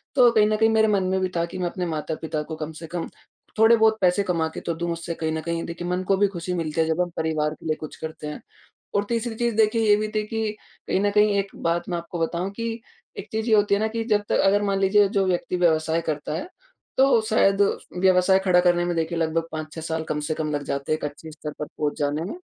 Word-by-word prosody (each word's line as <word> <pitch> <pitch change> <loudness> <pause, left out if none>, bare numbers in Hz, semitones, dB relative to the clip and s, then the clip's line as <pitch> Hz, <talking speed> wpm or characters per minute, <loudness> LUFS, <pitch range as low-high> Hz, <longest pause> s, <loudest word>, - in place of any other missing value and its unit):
तो 250 -3 +7
कहीं 215 -2 +4
न 215 - +1
कहीं 225 +1 +3
मेरे 220 0 +4
मन 200 -3 +2
में 190 +1 0
भी 185 - 0
था 170 - +1
कि 170 - -8
मैं 180 -1 -1
अपने 180 +1 -4
माता-पिता 155 -1 -3
को 160 +1 -6
कम 155 0 -5
से 165 - -8
कम 170 +1 -4 0.5
थोड़े-बहुत 220 0 +5
पैसे 185 +2 +3
कमा 170 -4 0
के - - -5
तो 170 - -2
दूँ, 170 +1 -3
उससे 170 0 -5
कहीं 160 -1 -2
न 160 - -2
कहीं 170 0 -3
देखिए 170 +1 -6
मन 180 +1 -1
को 195 - +4
भी 205 +1 +4
ख़ुशी 175 +1 -4
मिलती 165 -2 -1
है, - - +3
जब 160 +2 +1
हम 180 - 0
परिवार 155 -1 0
के - - -15
लिए 155 -1 0
कुछ 155 - -8
करते 160 -1 -7
हैं। 150 - -6 0.5
और 205 - +3
तीसरी 230 -1 -1
चीज़ 235 -1 -1
देखिए 220 +1 +3
ये 205 - +7
भी 215 +1 -1
थी 215 - +1
कि 220 -1 -2 0.4
कहीं - - +1
न 205 - +2
कहीं 210 0 +4
एक 200 0 -2
बात 170 +1 -1
मैं 175 - -1
आपको 170 +1 -6
बताऊँ 170 +3 -1
कि 230 +3 -3 0.5
एक - - -6
चीज़ 220 +1 -2
ये 220 - +6
होती 205 -1 +3
है - - -1
ना 220 - +2
कि 225 +1 -3
जब 210 -1 +3
तक - - +2
अगर 200 +1 +4
मान 200 -1 0
लीजिए 200 +1 +4
जो 195 -2 +1
व्यक्ति 180 0 -1
व्यवसाय 160 -1 +2
करता 150 -2 -3
है, 305 - -4 0.5
तो 265 -3 +5
शायद 195 -2 +3 0.4
व्यवसाय 185 +1 +4
खड़ा 180 -2 +5
करने 175 -1 +3
में 175 -1 -1
देखिए 165 +1 -1
लगभग 165 0 0
5-6 155 0 -6
साल 160 0 -3
कम 150 - -1
से - - +1
कम 155 -1 -2
लग 145 -1 -2
जाते 140 +1 -3
हैं 155 - +3
एक 155 - -5
अच्छे 150 +2 -7
स्तर 150 0 -7
पर 150 - -2
पहुँच 150 0 -3
जाने 145 +2 0
में। 195 - -5
175 Hz, 265 wpm, -24 LUFS, 160-205 Hz, 0.5 s, तो